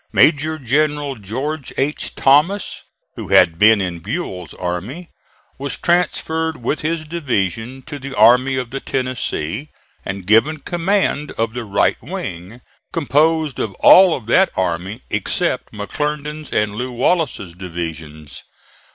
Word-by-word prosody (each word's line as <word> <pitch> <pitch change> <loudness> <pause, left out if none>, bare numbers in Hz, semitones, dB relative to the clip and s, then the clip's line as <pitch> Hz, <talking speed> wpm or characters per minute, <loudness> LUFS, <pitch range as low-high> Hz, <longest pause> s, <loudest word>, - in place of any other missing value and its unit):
Major 155 +1 +3
General 145 +1 0
George 130 +7 -5
H. 140 +3 -2
Thomas, 150 +9 +2 0.3
who - - -7
had 80 0 +4
been 110 0 +6
in 90 -3 -3
Buell's 95 - -5
army, 95 - -5 0.5
was 140 -1 -2
transferred 160 -2 0
with 125 +5 -2
his 155 0 -2
division 130 - -2
to 145 +1 -7
the 135 0 -7
Army 125 +5 +5
of 125 -2 -4
the 135 - -3
Tennessee 130 - -3 0.3
and 95 -1 -5
given 115 +10 +4
command 175 -3 0
of 115 0 -2
the 120 -1 -5
right 100 -1 +1
wing, 90 +8 -7 0.3
composed 155 -1 +1
of 100 -4 -3
all 185 -3 +7
of 120 - -8
that 185 - +4
army 95 +2 -2
except - - -1
McClernand's 150 +7 -4
and 105 -1 0
Lew. 125 +4 -4
Wallace's 125 - 0
divisions. 80 -4 -7
130 Hz, 130 wpm, -19 LUFS, 100-155 Hz, 0.5 s, all